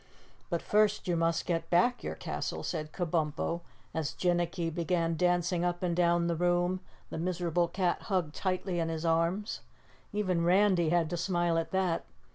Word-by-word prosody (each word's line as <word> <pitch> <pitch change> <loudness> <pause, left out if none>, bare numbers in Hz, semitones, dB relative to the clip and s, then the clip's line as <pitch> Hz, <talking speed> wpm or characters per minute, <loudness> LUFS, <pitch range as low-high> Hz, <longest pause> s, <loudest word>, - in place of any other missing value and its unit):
"But 170 -3 -1
first 210 -1 +2
you 175 - +2
must 165 0 +1
get 165 -1 -1
back 245 +8 +3
your - - -3
castle," - - -4
said 155 0 -3
Kabumpo 170 -1 -1 0.3
as 160 -3 -2
Jinnicky 175 -1 0
began 170 0 0
dancing 175 0 +1
up 175 0 -1
and 175 -2 +1
down 170 -1 +3
the 170 0 0
room, 175 +2 +1 0.3
the - - -4
miserable 175 0 0
cat 180 -1 0
hugged 180 -6 0
tightly 185 -1 -1
in 165 -1 0
his 165 0 -3
arms. 170 +6 0 0.5
Even 185 -5 0
Randy 180 -1 +4
had 170 -1 +2
to 175 - -1
smile 175 -1 +1
at 165 - -3
that. 185 -3 0
175 Hz, 165 wpm, -31 LUFS, 165-180 Hz, 0.5 s, Randy